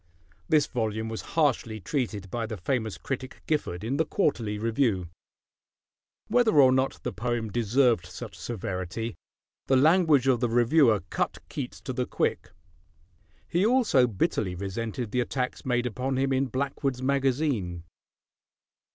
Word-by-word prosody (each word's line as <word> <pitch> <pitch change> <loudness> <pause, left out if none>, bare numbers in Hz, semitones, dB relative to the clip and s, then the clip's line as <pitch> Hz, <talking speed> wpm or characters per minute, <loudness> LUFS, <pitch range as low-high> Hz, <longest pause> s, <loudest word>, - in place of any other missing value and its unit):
This 150 -2 +4
volume 110 -2 -2
was 110 - -4 0.2
harshly 125 -8 +1
treated 105 - -3
by 115 -2 -2
the 110 -1 -5
famous 110 +2 -2
critic 130 -1 -6
Gifford 105 - -1
in 125 +5 -1
the 160 - +3
Quarterly 115 - +1
Review. 110 -5 0 1.2
Whether 230 -10 +4
or 130 -2 +7
not 130 +1 +1
the - - -3
poem 120 -2 -2
deserved 120 -3 +2
such 90 - -8
severity, 100 0 -4 0.5
the 135 - +4
language 155 -2 +4
of 130 -3 +4
the 120 -1 +1
reviewer 120 - +4
cut - - -1
Keats - - -5
to - - -5
the - - -2
quick. - - -1 1.0
He 175 +3 +1
also 215 - +4
bitterly 95 -3 -1
resented 105 +4 -4
the 125 - +1
attacks 125 +1 -3
made 120 -1 +1
upon 130 +3 -2
him 135 0 +1
in 135 +1 +1
Blackwood's 135 0 -2
Magazine. 130 - 0
125 Hz, 140 wpm, -27 LUFS, 110-135 Hz, 1.2 s, or